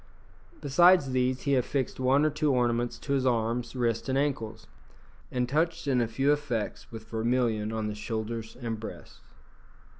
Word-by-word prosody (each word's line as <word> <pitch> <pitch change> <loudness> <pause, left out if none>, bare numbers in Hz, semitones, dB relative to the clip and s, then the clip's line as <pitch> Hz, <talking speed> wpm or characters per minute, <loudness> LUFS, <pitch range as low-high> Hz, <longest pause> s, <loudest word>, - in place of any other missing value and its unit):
Besides 175 0 +5
these 130 0 +1
he 140 - 0
affixed 130 +1 0
one 135 +3 +3
or 155 - +2
two 150 0 +1
ornaments 120 -1 +1
to 140 - -3
his 135 -2 +1
arms, 120 0 0
wrists, 120 0 -1
and 130 - +1
ankles, 115 -6 -2 0.7
and 125 -1 0
touched 160 +3 0
in 130 -3 +2
a 115 - +1
few 135 +6 +2
effects 125 -8 -3
with 110 -1 -9
vermilion 115 -2 0
on 110 -1 -2
the 105 - -2
shoulders 110 +1 -5
and 115 -3 -4
breast. 110 - -9
125 Hz, 160 wpm, -28 LUFS, 115-140 Hz, 0.7 s, Besides